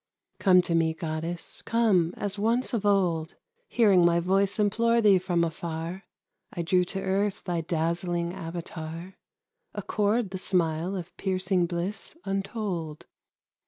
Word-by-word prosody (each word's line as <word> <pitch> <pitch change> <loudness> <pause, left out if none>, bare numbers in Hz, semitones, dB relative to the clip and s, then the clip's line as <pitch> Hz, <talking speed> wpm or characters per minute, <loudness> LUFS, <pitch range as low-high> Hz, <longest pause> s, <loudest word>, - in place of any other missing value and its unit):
Come 185 -2 +5
to 170 - -2
me, 165 -1 +2
Goddess, 165 +1 -4
come 200 -8 +2
as 205 0 -3
once 235 +5 +1
of 210 -3 0
old, 175 -5 +1 0.3
Hearing 200 -7 +4
my 170 0 +4
voice 195 +3 +1
implore 230 +3 +2
thee 205 -4 +5
from 175 -2 0
afar, 165 +2 -4 0.5
I 170 - -3
drew 180 +2 +3
to 190 - -4
earth 195 +1 -1
thy 175 -3 -1
dazzling 170 +1 -1
avatar; 165 +1 -7 0.6
Accord 210 0 0
the 190 - -4
smile 175 0 0
of 180 -2 -7
piercing 185 -2 0
bliss 180 - -4
untold. 195 -5 -3
180 Hz, 130 wpm, -27 LUFS, 170-200 Hz, 0.6 s, Come